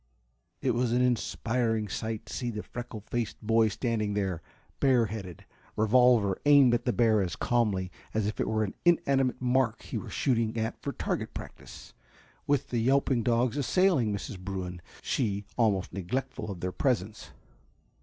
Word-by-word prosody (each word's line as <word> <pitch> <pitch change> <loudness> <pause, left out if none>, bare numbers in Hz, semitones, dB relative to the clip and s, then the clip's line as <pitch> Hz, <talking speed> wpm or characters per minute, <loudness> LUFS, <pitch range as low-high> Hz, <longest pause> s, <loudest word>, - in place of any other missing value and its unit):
It - - +3
was 120 0 0
an 125 +1 +3
inspiring 115 -2 0
sight 110 +2 -4
to - - -9
see 120 - -2
the 105 -2 -5
freckle 120 -3 -7
faced 115 +1 -3
boy 115 +1 +3
standing 110 -1 -1
there, 95 -5 -1 0.4
bare 130 -4 +4
headed, 100 -5 -7 0.3
revolver 110 -3 +4
aimed 140 -4 +6
at 120 - 0
the 125 - +2
bear 110 -1 +3
as 90 -3 -2
calmly 105 -7 0 0.2
as 110 -1 0
if 105 - -3
it - - 0
were 110 0 +1
an 100 - -3
inanimate 135 -7 +2
mark 125 -2 +1
he - - -4
were - - -8
shooting 115 -3 0
at 110 +1 -3
for - - -3
target - - -3
practice, - - -10 0.5
with 145 -3 +1
the 120 - 0
yelping 130 +1 +2
dogs 120 +3 +1
assailing 145 - +2
Mrs. 100 -1 -5
Bruin, 90 -2 -5 0.2
she 100 -5 -1
almost 105 -6 +1
neglectful 110 +4 -3
of 95 -4 -6
their 90 - -2
presence. 110 -3 -1
115 Hz, 165 wpm, -29 LUFS, 105-125 Hz, 0.5 s, aimed